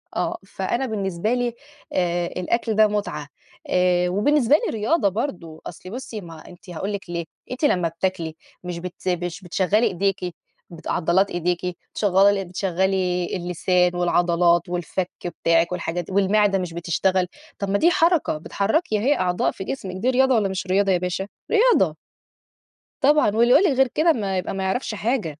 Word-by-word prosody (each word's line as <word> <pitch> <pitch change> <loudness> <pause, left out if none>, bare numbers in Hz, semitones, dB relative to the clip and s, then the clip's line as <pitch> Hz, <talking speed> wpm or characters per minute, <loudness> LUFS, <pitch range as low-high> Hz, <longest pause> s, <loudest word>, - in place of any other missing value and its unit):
آه. - - -1
فأنا 265 +3 -2
بالنسبة 200 -2 -1
لي 245 -1 0 0.4
آآ 175 -1 0
الأكل 220 +6 -1
ده 215 0 +6
مُتعة، 205 -8 -3 0.4
آآ 180 -1 +2
وبالنسبة 255 +7 +3
لي - - 0
رياضة 220 +1 +2
برضه 180 - -5
أصلي 185 +2 -10
بُصّي 230 -3 -6
ما 165 -2 -11
ه - - -16
أنتِ 180 +2 -15
هاقول 190 +4 -4
لِك 195 -3 -6
ليه، 170 -1 -3 0.3
أنتِ 255 +4 -1
لمّا 180 -12 +2
بتاكلي 165 -1 -3 0.3
مش 180 -1 -5
بت 180 +1 -5
مش 175 +1 -3
بتشغّلي 195 +5 +1
إيديكِ 195 0 0 0.5
بت 170 -2 -11
عضلات 185 +4 +2
إيديكِ، 175 0 -2 0.2
شغّال 200 0 +3
بتشغَّلي 185 0 0
اللسان 180 0 +1
والعضلات 175 -1 +2
والفَك 180 +1 -3 0.3
بتاعِك 165 +1 +3
والحاجات 175 -1 -3
دي - - -10
والمِعدة 200 +1 +3
مش 180 -2 -4
بتشتغل، 180 +2 0 0.3
طب 200 - -2
ما 200 - +2
دي 340 +10 +4
حركة، 335 - +2
بتحرّكي 215 - 0
أهي 270 +7 +2
أعضاء 180 -1 +1
في - - -7
جسمك 190 -5 -5
دي 215 +7 0
رياضة 260 0 +3
والّا 210 -3 +2
مش 190 0 -4
رياضة 195 +1 +2
يا 185 - +4
باشا؟ 180 +2 -3 0.2
رياضة. 475 +2 +4 1.0
طبعًا. 295 -2 +4
واللي 235 +2 +4
يقول 310 - +6
لِك 375 - +3
غير 265 0 +5
كده 320 +6 +2
ما 195 -6 -2
يبقى 180 - -3
ما 195 0 -3
يعرفش 215 +4 -2
حاجة. 210 - -2
190 Hz, 170 wpm, -23 LUFS, 175-220 Hz, 1.0 s, ده